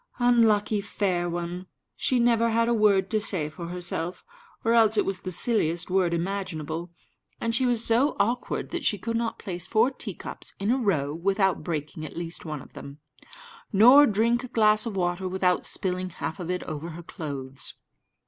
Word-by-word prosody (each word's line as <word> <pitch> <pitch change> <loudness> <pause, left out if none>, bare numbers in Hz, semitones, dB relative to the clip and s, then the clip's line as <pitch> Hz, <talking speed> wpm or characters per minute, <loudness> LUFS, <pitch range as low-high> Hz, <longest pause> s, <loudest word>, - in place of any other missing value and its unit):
Unlucky 220 -4 +3
fair 185 -3 -1
one! 175 +2 -4 0.3
she 255 - +1
never 230 -1 +3
had 230 +1 +2
a 235 - +2
word 205 -4 +3
to 215 -1 +1
say 175 -8 0
for 170 +1 -7
herself, 175 0 -4 0.4
or 230 - +3
else 220 -2 +4
it - - +3
was 195 -1 -2
the 185 - -5
silliest 180 -4 0
word 185 -2 +2
imaginable, 170 -2 -3 0.5
and 230 0 -1
she 255 +2 +2
was 235 -2 +1
so 240 +6 +3
awkward 240 +3 -1
that 345 -3 -3
she 210 - +2
could 230 +4 -3
not 230 0 -1
place 180 -3 -5
four 230 +4 +3
teacups 215 -7 -8
in 200 +3 0
a 260 - +3
row 155 - 0
without 195 +3 +1
breaking 155 -2 -4
at 155 - -8
least 170 0 -6
one 150 -4 -5
of - - -18
them, 140 +1 -10 0.7
nor 250 +8 +8
drink 235 +3 +1
a - - -5
glass 215 -2 +3
of 215 - -4
water 180 0 -1
without 185 -1 +1
spilling 185 -1 -3
half 180 0 -5
of 175 -1 -5
it 180 0 -2
over 155 +2 -6
her 170 +1 -9
clothes. 140 -5 -6
195 Hz, 185 wpm, -26 LUFS, 175-230 Hz, 0.7 s, nor